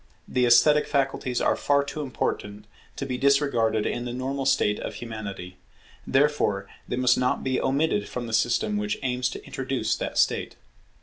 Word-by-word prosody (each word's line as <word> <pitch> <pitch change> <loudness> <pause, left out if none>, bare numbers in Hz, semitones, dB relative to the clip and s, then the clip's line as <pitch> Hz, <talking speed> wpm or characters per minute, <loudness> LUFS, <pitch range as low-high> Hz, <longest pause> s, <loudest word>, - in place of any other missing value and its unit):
The 125 -1 +1
esthetic 150 +5 +5
faculties 135 -3 0
are - - +2
far 140 0 +2
too 140 +2 -5
important 105 -5 -3 0.3
to 135 - -4
be 125 -2 -3
disregarded 130 -6 +2
in 120 - -2
the 120 - -4
normal 135 +2 -2
state 105 -5 +2
of - - -5
Humanity; 100 -6 -7 0.5
therefore 135 -9 +1 0.2
they - - -2
must 125 0 +3
not 125 0 0
be 130 -1 0
omitted 135 -6 0
from 125 -1 -4
the 115 - -6
system 120 - +1
which 210 0 -2
aims 125 -1 0
to - - -8
introduce 135 -1 -2
that - - -4
state. - - +1
125 Hz, 170 wpm, -25 LUFS, 115-140 Hz, 0.5 s, esthetic